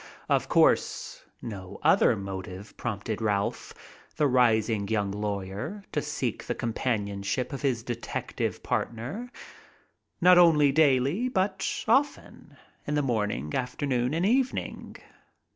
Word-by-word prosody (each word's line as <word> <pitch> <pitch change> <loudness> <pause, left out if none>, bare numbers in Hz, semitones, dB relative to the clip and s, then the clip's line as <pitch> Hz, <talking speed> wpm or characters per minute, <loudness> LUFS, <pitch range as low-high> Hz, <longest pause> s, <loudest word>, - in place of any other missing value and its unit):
Of - - +1
course - - +2 0.2
no 95 -5 -7
other - - +5
motive 95 0 -7
prompted 110 -1 -4
Ralph, 100 -2 -1 0.4
the 150 - +2
rising 110 -5 +2
young 105 -2 0
lawyer, 105 - -4
to 150 - 0
seek 140 -6 -3
the - - -3
companionship 105 0 -2
of 135 - -5
his 130 -5 0
detective 120 -1 -4
partner, 135 - -3 0.9
not 180 0 +7
only 150 -5 +6
daily 145 - +3
but 190 -4 -1
often, 275 +5 0 0.3
in 150 - 0
the 145 - +1
morning, 105 - -1
afternoon 125 +1 -1
and 170 +3 +1
evening. 255 +4 -1
125 Hz, 115 wpm, -27 LUFS, 105-150 Hz, 0.9 s, not